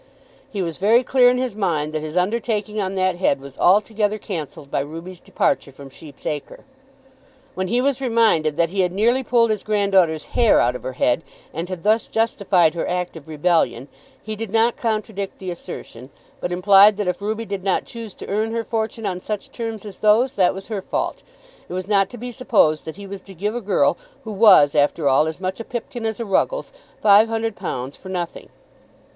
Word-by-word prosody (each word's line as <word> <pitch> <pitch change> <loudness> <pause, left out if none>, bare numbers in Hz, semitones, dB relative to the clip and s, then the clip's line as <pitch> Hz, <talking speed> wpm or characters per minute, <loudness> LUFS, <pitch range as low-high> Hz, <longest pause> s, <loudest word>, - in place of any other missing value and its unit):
He 200 -3 -3
was 165 -1 -5
very 225 +6 +4
clear 250 -1 +5
in 250 - +1
his 255 -4 -2
mind 160 -7 -1
that 155 - -2
his 155 +2 -5
undertaking 210 +2 -1
on 190 0 -3
that 185 -1 +1
head 175 -6 +1
was 135 0 -12
altogether 210 +2 +2
cancelled 155 -8 -7
by - - 0
Ruby's 165 +5 -7
departure 185 -7 -1
from 135 0 -12
Sheep's 145 0 -14
Acre. 150 -2 -5 0.9
When 185 0 -3
he 240 +5 +1
was 275 0 0
reminded 225 - +2
that 170 0 +2
he 195 - -3
had 180 -2 +2
nearly 235 +7 +2
pulled 230 -2 +2
his 215 - -1
granddaughter's 195 -7 +2
hair 235 -3 +4
out 125 +1 +2
of - - -6
her 130 - -5
head, 125 +3 +1 0.3
and 170 +3 -4
had 185 -3 -6
thus 215 +2 +2
justified 200 -7 +2
her 170 - -3
act 180 -1 -2
of 160 -2 -11
rebellion, 155 -4 0 0.3
he 215 0 -5
did 225 0 -5
not 225 +3 +2
contradict 215 -3 -3
the 185 -2 -5
assertion, 130 -7 -9 0.3
but 175 - -3
implied 200 +3 +6
that 205 -3 -2
if 180 +1 -2
Ruby 220 +2 -3
did 200 -3 -5
not 195 -1 0
choose 230 -4 -9
to - - -10
earn 220 +3 -1
her 230 0 -1
fortune 225 0 -3
on 180 -2 -3
such 210 0 -5
terms 225 -3 -5
as 200 -3 -10
those, 220 +5 +3
that 185 -2 +2
was 195 - -8
her 210 -3 -3
fault. - - -3 0.5
It - - -6
was 185 0 -4
not 195 -2 +2
to 245 - -9
be 245 +2 -6
supposed 220 - +2
that 160 - -6
he 200 - -9
was 195 0 -8
to 195 -1 -14
give 205 +5 -2
a 240 - -3
girl, 205 - +2 0.2
who 220 - -6
was 195 -9 +6
after 145 +1 +2
all 140 +3 +4
as 160 +1 -5
much 185 +2 -3
a - - -4
Pipkin 235 -1 -5
as 220 0 -4
a 235 - -3
Ruggles, - - 0 0.3
five 210 +2 +6
hundred 225 -1 -2
pounds 130 +2 -5
for 190 - -12
nothing. 175 -2 -5
195 Hz, 210 wpm, -21 LUFS, 170-225 Hz, 0.9 s, implied